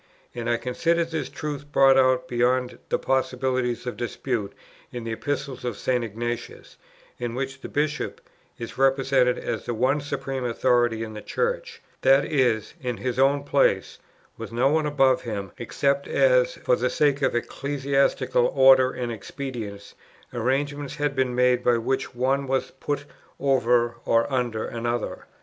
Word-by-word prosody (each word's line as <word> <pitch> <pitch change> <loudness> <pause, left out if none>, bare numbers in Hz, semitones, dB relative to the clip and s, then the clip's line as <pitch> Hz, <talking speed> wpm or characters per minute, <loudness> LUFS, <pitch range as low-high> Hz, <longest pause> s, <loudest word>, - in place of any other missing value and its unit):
And 120 -1 -4
I 120 - +2
considered 165 +8 0
this 160 - -3
truth 145 -1 -6
brought 135 -1 +6
out, 130 -1 +3
beyond 125 +1 0
the - - +2
possibility 130 -1 0
of 125 - -4
dispute, 120 -3 -3 0.4
in 120 -1 -6
the 115 - -4
Epistles 140 +2 -3
of 120 -4 -3
St. 125 -2 0
Ignatius, 115 +2 -5 0.4
in 120 -1 -3
which 135 +1 -4
the - - -7
Bishop 150 +1 -2 0.4
is 115 +2 -8
represented 135 -2 +3
as 115 -4 -4
the 120 - -1
one 130 +6 +1
supreme 135 -2 -4
authority 120 -1 +1
in 110 -1 -7
the 105 - -7
Church, 475 -1 -3 0.2
that 135 +2 +5
is, 125 -8 +1
in 125 -3 -3
his 125 0 -3
own 140 +1 +3
place, 140 -1 +1 0.4
with - - -7
no 125 +4 +2
one 155 0 +1
above 135 -3 +3
him, 100 -6 -5
except 140 +4 0
as, - - +3
for - - +1
the - - 0
sake 145 -1 +1
of 130 -3 +1
ecclesiastical 135 -1 +1
order 130 -1 +7
and 125 -2 -4
expedience, 110 -3 -7 0.4
arrangements 140 +4 -1
had 145 -1 -1
been 130 -2 0
made 125 0 +3
by 120 -1 +3
which 130 +2 -2
one 135 +3 0
was 135 0 -1
put 145 +1 -4 0.3
over 120 -3 +2
or 115 0 +3
under 120 -4 -1
another. 120 0 -3
130 Hz, 155 wpm, -25 LUFS, 120-140 Hz, 0.4 s, order